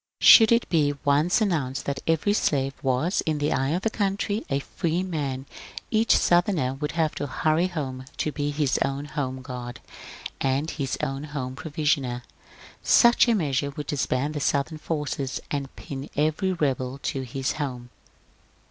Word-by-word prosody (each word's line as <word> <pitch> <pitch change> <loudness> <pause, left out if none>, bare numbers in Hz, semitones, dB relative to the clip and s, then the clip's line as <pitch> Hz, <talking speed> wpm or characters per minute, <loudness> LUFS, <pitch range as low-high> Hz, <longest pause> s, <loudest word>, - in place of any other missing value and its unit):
Should 225 -1 +9
it 235 0 +3
be 145 -4 +2
once 150 +9 +3
announced 150 -9 -1
that 140 -1 -2
every 165 +5 +2
slave 135 -9 +1
was, 135 +8 +1
in 155 -1 +1
the 145 0 0
eye 135 +1 0
of 175 +5 -1
the 225 - +1
country, 205 +1 -1
a 140 - +1
free 170 +5 -2
man, 140 -7 -3 0.5
each 220 +1 +4
Southerner 175 -7 +2
would 150 +2 -4
have 160 -2 +1
to 145 - -4
hurry 155 +5 +1
home 135 -7 -5
to 150 - -1
be 145 0 -2
his 145 -2 0
own 135 +1 -1
home 135 -3 -4
g^ard 125 -2 -6 0.6
and 135 +4 0
his 135 -4 -3
own 135 0 -2
home 135 -4 -5
provisioner. 145 -5 -1 0.6
Such 240 +1 +5
a 235 - +4
measure 140 -6 0
would 145 +1 -6
disband 145 0 -1
the 150 - -3
Southern 145 +3 0
forces, 150 -4 -3
and 140 -2 -3
pin 135 -1 -7
every 155 +6 +1
rebel 135 -6 -1
to 135 - -2
his 130 +1 -2
home." 125 -3 -5
145 Hz, 165 wpm, -25 LUFS, 135-165 Hz, 0.6 s, Should